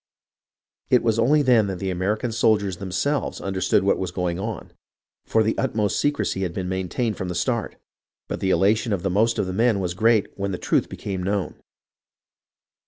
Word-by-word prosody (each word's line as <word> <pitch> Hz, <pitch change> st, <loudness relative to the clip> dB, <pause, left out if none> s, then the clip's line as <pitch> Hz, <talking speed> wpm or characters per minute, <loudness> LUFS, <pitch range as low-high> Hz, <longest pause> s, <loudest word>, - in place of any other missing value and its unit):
It 125 Hz, -, +4 dB
was 115 Hz, -1 st, +1 dB
only 145 Hz, +6 st, +4 dB
then 120 Hz, -6 st, +4 dB
that 95 Hz, -2 st, -3 dB
the 95 Hz, +1 st, -3 dB
Ameri 95 Hz, +4 st, 0 dB
can 120 Hz, +1 st, -3 dB
soldiers 105 Hz, -4 st, +1 dB
themselves 100 Hz, +10 st, -2 dB
understood 95 Hz, 0 st, +1 dB
what 100 Hz, -, +2 dB
was 95 Hz, -, -2 dB
going 90 Hz, 0 st, -2 dB
on, 105 Hz, -1 st, -5 dB, 0.6 s
for 110 Hz, -, +3 dB
the 110 Hz, -, 0 dB
utmost 110 Hz, -6 st, 0 dB
secrecy 145 Hz, -9 st, 0 dB
had 90 Hz, -3 st, -2 dB
been 95 Hz, -2 st, -3 dB
maintained 95 Hz, +4 st, -2 dB
from 95 Hz, -, -4 dB
the 90 Hz, -, -4 dB
start, 115 Hz, +4 st, -1 dB, 0.5 s
but -, -, -4 dB
the 95 Hz, -, -1 dB
elation 105 Hz, +4 st, +2 dB
of 95 Hz, -, -2 dB
the 95 Hz, -, 0 dB
most 110 Hz, +5 st, +2 dB
of -, -, 0 dB
the 90 Hz, -, -4 dB
men 115 Hz, 0 st, +2 dB
was 90 Hz, -2 st, -2 dB
great 110 Hz, +2 st, +2 dB
when 100 Hz, 0 st, -3 dB
the 90 Hz, -, -3 dB
truth -, -, 0 dB
became 95 Hz, -2 st, -5 dB
known. 100 Hz, +1 st, -1 dB
100 Hz, 190 wpm, -23 LUFS, 95-115 Hz, 0.6 s, It